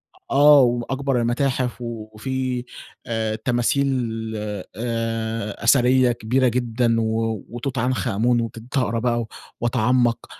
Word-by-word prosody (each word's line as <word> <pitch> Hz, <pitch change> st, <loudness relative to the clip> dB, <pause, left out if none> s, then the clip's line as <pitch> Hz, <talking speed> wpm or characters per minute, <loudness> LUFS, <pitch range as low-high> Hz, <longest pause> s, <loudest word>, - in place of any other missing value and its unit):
أ -, -, -20 dB
آه، 145 Hz, +1 st, +7 dB
وأكبر 125 Hz, +1 st, 0 dB
المتاحف 125 Hz, +1 st, -1 dB
وفي 120 Hz, +3 st, -4 dB, 0.4 s
آآ، 110 Hz, -1 st, -1 dB
تماثيل 120 Hz, +4 st, +1 dB, 0.5 s
آآ، 110 Hz, +1 st, -4 dB
أثرية 125 Hz, +1 st, +4 dB
كبيرة 120 Hz, +3 st, +1 dB
جدًا، 120 Hz, -1 st, +1 dB
و 110 Hz, -1 st, -1 dB
وتوت 120 Hz, +3 st, -5 dB
عنخ 130 Hz, +1 st, 0 dB
امون 120 Hz, +2 st, +2 dB
وكنت 115 Hz, +3 st, -5 dB
هاقرا 115 Hz, -3 st, +1 dB
بقى 120 Hz, 0 st, 0 dB
و 115 Hz, -, -6 dB, 0.3 s
واتعمق. 120 Hz, 0 st, +1 dB
120 Hz, 115 wpm, -22 LUFS, 115-125 Hz, 0.5 s, آه